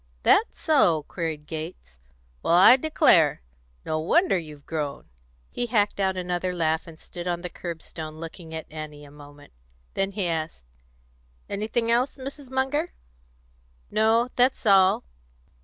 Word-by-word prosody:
"That 450 - +5
so?" 180 - +2
queried 160 -2 -5
Gates. 155 - -8 0.4
"Well, 170 - +2
I 190 +7 +9
declare! 250 - +3 0.4
No 155 - -1
wonder 335 - +3
you've 150 -5 -6
grown!" 150 -3 -4 0.5
He 240 - -2
hacked 210 -3 +1
out 190 -1 +1
another 180 0 -2
laugh, 160 -1 0
and 160 -1 -12
stood 175 0 -8
on 175 -1 -1
the 180 -1 -6
curb 170 -2 -7
stone 155 -1 -8
looking 165 +1 -9
at 160 - -5
Annie 150 -1 -8
a 140 - -15
moment. 145 - -15 0.4
Then 195 0 -1
he 195 -2 -2
asked, 160 - -3 0.8
"Anything 220 +3 -1
else, 245 +5 +1
Mrs. 275 0 -8
Munger?" 270 +6 -1 1.0
"No; 225 +3 +3
that's 255 0 +2
all. 195 -2 +5
175 Hz, 140 wpm, -25 LUFS, 155-230 Hz, 1.0 s, I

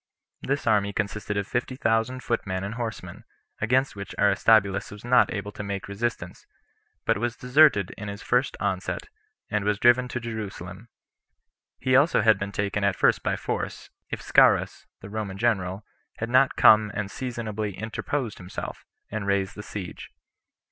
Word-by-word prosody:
This 140 +2 -2
army 100 -2 +2
consisted 105 0 -3
of 100 - -1
fifty 120 +4 -2
thousand 115 +1 0
footmen 95 -5 -2
and 100 +3 -4
horsemen, 115 -2 -6 0.4
against 130 +4 +2
which 100 0 -7
Aristobulus 100 -1 +3
was 105 +2 -11
not 125 +1 +4
able 100 0 -4
to - - -7
make 100 -1 -4
resistance, 100 -3 -4 0.6
but - - +2
was 120 +1 -1
deserted 125 - +4
in 105 - -6
his 100 0 -7
first 125 +1 +1
onset, 95 -3 -2 0.4
and 105 -1 0
was 105 0 +1
driven 120 +3 +4
to 125 - -4
Jerusalem; 110 -3 -7 0.9
he 130 -1 +1
also 140 +5 +4
had 110 -3 +4
been 100 0 -4
taken 100 0 -2
at 100 -1 +2
first - - +3
by - - 0
force, - - -4 0.2
if - - -5
Scaurus, - - +3
the - - -9
Roman 105 -3 -4
general, 100 -3 0 0.3
had 115 +1 -4
not 130 +1 +4
come 105 -1 +6
and 100 -2 -3
seasonably 110 -5 -4
interposed 115 +3 -3
himself, 90 +1 -7 0.2
and 105 -2 -3
raised 100 0 0
the 105 - -8
siege. 100 -3 -7
105 Hz, 160 wpm, -26 LUFS, 100-120 Hz, 0.9 s, come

